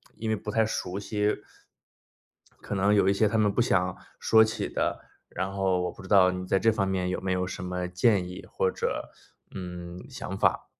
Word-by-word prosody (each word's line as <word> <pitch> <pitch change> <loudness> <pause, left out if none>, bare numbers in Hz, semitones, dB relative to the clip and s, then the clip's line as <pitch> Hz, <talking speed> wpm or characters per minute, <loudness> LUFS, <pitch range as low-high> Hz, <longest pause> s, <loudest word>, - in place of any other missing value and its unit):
因 110 0 -4
为 110 - +2
不 105 - -7
太 110 0 +3
熟 95 -3 -3
悉， 105 0 0 1.3
可 - - -6
能 100 +2 +3
有 95 -1 +4
一 - - +4
些 105 +2 +3
他 110 - 0
们 105 -2 +3
不 120 - +2
想 90 -5 +1 0.2
说 110 0 +6
起 110 - -2
的， - - -2 0.2
然 95 +2 -3
后 95 -2 +1
我 90 - -2
不 - - -13
知 95 - -10
道 95 -2 +6
你 90 0 -4
在 95 - +2
这 115 - +4
方 100 -2 0
面 90 -1 -1
有 90 - -2
没 95 0 -2
有 90 0 +1
什 90 - -6
么 90 0 -3
建 90 0 +2
议， 90 - -8
或 - - 0
者， - - -3 0.4
嗯， 90 -1 -7
想 - - -6
法。 - - +2
95 Hz, 230 characters per minute, -27 LUFS, 90-105 Hz, 1.3 s, 说